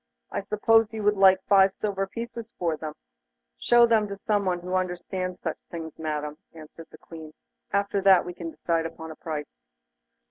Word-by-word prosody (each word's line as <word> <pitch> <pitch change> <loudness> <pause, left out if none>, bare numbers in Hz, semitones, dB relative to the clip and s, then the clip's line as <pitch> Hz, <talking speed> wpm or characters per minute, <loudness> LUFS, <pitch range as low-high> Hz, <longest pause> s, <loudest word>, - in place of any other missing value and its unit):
I - - -2
suppose 215 +2 +3
you 220 -1 -4
would 210 0 +3
like 190 -1 +5
five 195 -1 +4
silver 195 -2 -2
pieces 230 +2 -7
for 170 -3 0
them.' 155 0 -7 0.6
'Show 240 0 +6
them 225 -2 +3
to 200 0 -6
someone 195 -4 0
who 180 +1 -5
understands 185 0 -2
such 160 - -4
things, 160 -2 -7
Madam,' 150 -1 -4
answered 160 +1 -12
the - - -14
Queen; 160 -2 -11 0.4
'after 200 0 0
that 190 -2 +6
we 180 - -6
can 170 -1 -6
decide 165 0 -1
upon 160 0 -10
the 160 - -8
price. 150 - -7
185 Hz, 175 wpm, -26 LUFS, 160-200 Hz, 0.6 s, Show